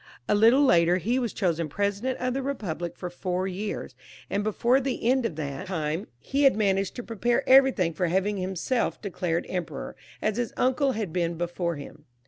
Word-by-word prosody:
A -, -, +3 dB
little 230 Hz, +7 st, +6 dB
later 175 Hz, -5 st, +4 dB
he 235 Hz, +8 st, 0 dB
was 240 Hz, -4 st, -1 dB
chosen 170 Hz, -5 st, -1 dB
President 205 Hz, -, -1 dB
of 255 Hz, 0 st, -1 dB
the 270 Hz, -, -1 dB
KepubUc 185 Hz, -, -4 dB
for 180 Hz, -1 st, -6 dB
four 180 Hz, +1 st, -2 dB
years, 195 Hz, +3 st, -4 dB, 0.4 s
and 205 Hz, -, 0 dB
before 235 Hz, +5 st, +2 dB
the 255 Hz, -3 st, -2 dB
end 255 Hz, -1 st, +3 dB
of 165 Hz, -, -8 dB
that 145 Hz, +2 st, -5 dB
time 160 Hz, 0 st, -2 dB
he 275 Hz, -, -2 dB
had 275 Hz, -5 st, +5 dB
managed 195 Hz, -2 st, +1 dB
to 245 Hz, -, -5 dB
prepare 235 Hz, +1 st, 0 dB
everything 260 Hz, -11 st, +5 dB
for 180 Hz, +2 st, 0 dB
having 190 Hz, +4 st, 0 dB
himself 190 Hz, +6 st, -1 dB
declared 180 Hz, -4 st, -2 dB
Emperor, 170 Hz, -5 st, -4 dB, 0.2 s
as 215 Hz, 0 st, -1 dB
his 245 Hz, -1 st, -2 dB
uncle 260 Hz, +1 st, +2 dB
had 210 Hz, -8 st, -3 dB
been 170 Hz, -1 st, 0 dB
before 175 Hz, 0 st, -2 dB
him. 145 Hz, +1 st, -10 dB
195 Hz, 185 wpm, -26 LUFS, 175-240 Hz, 0.4 s, little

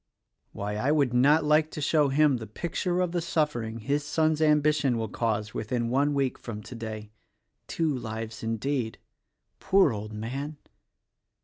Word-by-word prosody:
Why, 105 Hz, +1 st, -4 dB
I 130 Hz, +7 st, +1 dB
would 140 Hz, -5 st, +2 dB
not 145 Hz, +6 st, +5 dB
like 150 Hz, +1 st, +3 dB
to -, -, -7 dB
show 150 Hz, 0 st, +2 dB
him 145 Hz, -1 st, +3 dB
the 110 Hz, -2 st, -7 dB
picture 175 Hz, -, -2 dB
of 180 Hz, -2 st, 0 dB
the 175 Hz, -1 st, -1 dB
suffering 135 Hz, -9 st, -1 dB
his 145 Hz, +5 st, 0 dB
son's 155 Hz, +1 st, +1 dB
ambition 150 Hz, -4 st, +3 dB
will 110 Hz, -1 st, -2 dB
cause 105 Hz, -2 st, -2 dB
within 115 Hz, +2 st, -2 dB
one 140 Hz, +3 st, +2 dB
week 135 Hz, -2 st, 0 dB
from 105 Hz, -3 st, -7 dB
today. 110 Hz, -3 st, -7 dB, 0.6 s
Two 160 Hz, -4 st, 0 dB
lives, 110 Hz, -1 st, -6 dB
indeed! 115 Hz, +1 st, -2 dB, 0.6 s
Poor 190 Hz, -9 st, +4 dB
old 105 Hz, 0 st, -6 dB
man!" 135 Hz, +8 st, -5 dB
135 Hz, 150 wpm, -27 LUFS, 110-150 Hz, 0.6 s, not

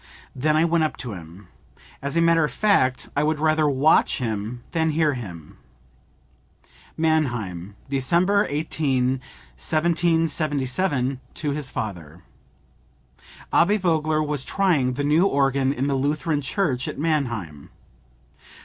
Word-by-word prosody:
Then 150 Hz, +4 st, +1 dB
I 160 Hz, -, +4 dB
went 170 Hz, -1 st, +2 dB
up 155 Hz, -, -2 dB
to 125 Hz, -5 st, -6 dB
him. 90 Hz, +2 st, -11 dB, 0.5 s
As 140 Hz, +4 st, -3 dB
a -, -, +4 dB
matter 165 Hz, -1 st, +4 dB
of 150 Hz, -, -1 dB
fact 130 Hz, -12 st, +1 dB
I 145 Hz, -, +2 dB
would 155 Hz, 0 st, 0 dB
rather 155 Hz, -1 st, +2 dB
watch 140 Hz, +3 st, +3 dB
him 115 Hz, 0 st, -4 dB
than 160 Hz, -1 st, +1 dB
hear 155 Hz, -1 st, +2 dB
him." 90 Hz, -, -9 dB, 1.4 s
(Mannheim, 120 Hz, -, -1 dB
December 170 Hz, +10 st, +2 dB
18, 135 Hz, -4 st, 0 dB, 0.4 s
1777, 155 Hz, -, 0 dB, 0.2 s
to 150 Hz, -2 st, -2 dB
his 140 Hz, -2 st, -2 dB
father. 90 Hz, -8 st, -6 dB, 1.3 s
Abbe 205 Hz, +5 st, +4 dB
Vogler 155 Hz, -4 st, +1 dB
was 150 Hz, -3 st, -1 dB
trying 155 Hz, -11 st, +1 dB
the 145 Hz, +3 st, -3 dB
new 155 Hz, +6 st, +3 dB
organ 135 Hz, -4 st, +1 dB
in 135 Hz, -1 st, -2 dB
the 140 Hz, -, 0 dB
Lutheran 145 Hz, +3 st, 0 dB
church 135 Hz, -3 st, -1 dB
at -, -, -5 dB
Mannheim. 120 Hz, -, -2 dB
145 Hz, 125 wpm, -23 LUFS, 125-160 Hz, 1.4 s, I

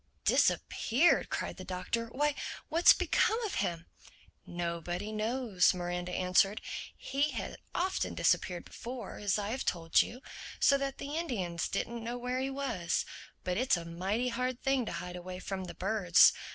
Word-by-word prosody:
_" -, -, -46 dB
"Disappeared!" 275 Hz, +10 st, +3 dB
cried -, -, -3 dB
the 185 Hz, -, -7 dB
Doctor. 185 Hz, +6 st, -2 dB
"Why, 295 Hz, +5 st, +1 dB, 0.4 s
what's 335 Hz, +2 st, +7 dB
become 445 Hz, +1 st, +2 dB
of 425 Hz, -, -1 dB
him?" 170 Hz, -1 st, -2 dB, 0.6 s
"Nobody 175 Hz, +3 st, -3 dB
knows," 215 Hz, -4 st, +2 dB
Miranda 175 Hz, 0 st, -3 dB
answered. 185 Hz, +3 st, +3 dB, 0.4 s
"He 280 Hz, +2 st, 0 dB
had -, -, -5 dB, 0.2 s
often 375 Hz, +2 st, 0 dB
disappeared 180 Hz, -2 st, +1 dB
before, 240 Hz, -3 st, -7 dB
as 205 Hz, -1 st, +1 dB
I 205 Hz, 0 st, -2 dB
have 260 Hz, -, -2 dB
told 165 Hz, -2 st, +3 dB
you—so 260 Hz, +2 st, -1 dB
that 275 Hz, -1 st, -3 dB
the 285 Hz, +2 st, -5 dB
Indians 195 Hz, -, -2 dB
didn't 235 Hz, -1 st, -3 dB
know 240 Hz, +2 st, -3 dB
where 250 Hz, +1 st, -2 dB
he 265 Hz, +1 st, -1 dB
was. 270 Hz, -11 st, -1 dB, 0.4 s
But 180 Hz, 0 st, -1 dB
it's 255 Hz, -4 st, +3 dB
a 170 Hz, -, -6 dB
mighty 190 Hz, +9 st, -1 dB
hard 250 Hz, +1 st, -2 dB
thing 270 Hz, -4 st, +1 dB
to -, -, -2 dB
hide 175 Hz, +2 st, -5 dB
away 180 Hz, +1 st, -6 dB
from 190 Hz, 0 st, -4 dB
the -, -, -8 dB
birds. 185 Hz, -3 st, +5 dB
215 Hz, 160 wpm, -32 LUFS, 180-255 Hz, 0.6 s, what's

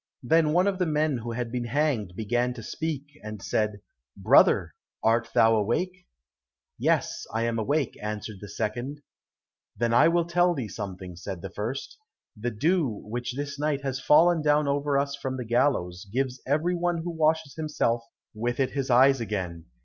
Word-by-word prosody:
Then 155 Hz, +4 st, +3 dB
one 180 Hz, +4 st, +3 dB
of 195 Hz, -2 st, 0 dB
the 180 Hz, -, +1 dB
men 150 Hz, -2 st, +1 dB
who 115 Hz, +1 st, -5 dB
had 120 Hz, -1 st, -3 dB
been 125 Hz, -1 st, -2 dB
hanged 120 Hz, -7 st, 0 dB
began 120 Hz, +4 st, 0 dB
to 115 Hz, -, -8 dB
speak, 155 Hz, +2 st, -3 dB, 0.2 s
and 105 Hz, 0 st, -6 dB
said, 105 Hz, 0 st, -1 dB, 0.4 s
"Brother, -, -, +4 dB, 0.3 s
art 115 Hz, +1 st, +2 dB
thou 115 Hz, 0 st, +6 dB
awake?" 180 Hz, -, -1 dB, 0.7 s
"Yes, -, -, 0 dB
I 115 Hz, +1 st, -1 dB
am 115 Hz, -1 st, 0 dB
awake," 140 Hz, +4 st, 0 dB
answered 105 Hz, 0 st, -5 dB
the 105 Hz, -, -8 dB
second. 120 Hz, +8 st, -4 dB, 0.7 s
"Then 115 Hz, -1 st, +1 dB
I 120 Hz, -, +6 dB
will 170 Hz, 0 st, +2 dB
tell 175 Hz, +1 st, +2 dB
thee 125 Hz, -7 st, -4 dB
something," 95 Hz, -3 st, -7 dB
said 95 Hz, 0 st, -7 dB
the 95 Hz, -, -6 dB
first; 115 Hz, -, -5 dB, 0.4 s
"the 115 Hz, +3 st, -2 dB
dew 155 Hz, -, +1 dB, 0.2 s
which 120 Hz, +3 st, -4 dB
this 140 Hz, 0 st, -4 dB
night 145 Hz, -2 st, 0 dB
has 135 Hz, -1 st, -2 dB
fallen 165 Hz, +4 st, +5 dB
down 150 Hz, 0 st, +3 dB
over 140 Hz, 0 st, +1 dB
us 140 Hz, 0 st, 0 dB
from 130 Hz, -2 st, -4 dB
the 125 Hz, -, -4 dB
gallows, 115 Hz, -7 st, 0 dB
gives 130 Hz, +1 st, -1 dB
every 155 Hz, +6 st, +1 dB
one 175 Hz, -1 st, -1 dB
who 175 Hz, -, -3 dB
washes 160 Hz, -2 st, +1 dB
himself 150 Hz, -7 st, -1 dB, 0.3 s
with 120 Hz, +3 st, -2 dB
it 130 Hz, -1 st, +1 dB
his 135 Hz, -2 st, -2 dB
eyes 130 Hz, +1 st, +5 dB
again. 90 Hz, -6 st, -4 dB
130 Hz, 175 wpm, -27 LUFS, 110-150 Hz, 0.7 s, thou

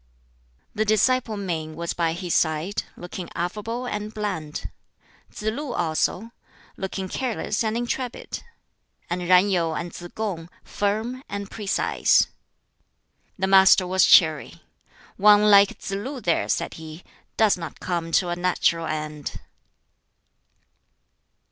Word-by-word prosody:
The 215 Hz, -, 0 dB
disciple 220 Hz, +1 st, +2 dB
Min 160 Hz, -5 st, -4 dB
was 170 Hz, +1 st, -3 dB
by 165 Hz, -2 st, 0 dB
his 175 Hz, 0 st, -3 dB
side, 160 Hz, +5 st, 0 dB
looking 175 Hz, 0 st, -7 dB
affable 215 Hz, +8 st, -3 dB
and 210 Hz, -3 st, -4 dB
bland; 200 Hz, -9 st, -4 dB, 0.6 s
Tsz -, -, -10 dB
lu 245 Hz, +5 st, -2 dB
also, 175 Hz, +6 st, -1 dB, 0.4 s
looking 190 Hz, 0 st, -4 dB
careless 230 Hz, 0 st, -2 dB
and 220 Hz, +1 st, -1 dB
intrepid; 240 Hz, +1 st, -4 dB, 0.7 s
and 180 Hz, +1 st, -1 dB
Yen 185 Hz, +3 st, +4 dB
Yu 170 Hz, -3 st, +1 dB
and 170 Hz, +1 st, -5 dB
Tsz 175 Hz, -, -9 dB
kung, 185 Hz, -7 st, -4 dB
firm 220 Hz, +5 st, -2 dB
and 200 Hz, 0 st, -5 dB
precise. 210 Hz, -2 st, +2 dB, 1.1 s
The 190 Hz, -, 0 dB
Master 190 Hz, -1 st, +6 dB
was 185 Hz, +1 st, +3 dB
cheery. 150 Hz, -, +4 dB, 0.5 s
"One 210 Hz, +1 st, +6 dB
like 200 Hz, -1 st, +6 dB
Tsz -, -, -7 dB
lu 255 Hz, +8 st, -4 dB
there," 175 Hz, -7 st, 0 dB
said -, -, -1 dB
he, 160 Hz, +2 st, -10 dB, 0.3 s
"does 220 Hz, -2 st, +4 dB
not 165 Hz, -3 st, -8 dB
come 170 Hz, -2 st, -3 dB
to 180 Hz, -, +3 dB
a 175 Hz, -, -1 dB
natural 175 Hz, -2 st, +1 dB
end." 155 Hz, -1 st, -5 dB
190 Hz, 125 wpm, -24 LUFS, 170-215 Hz, 1.1 s, Master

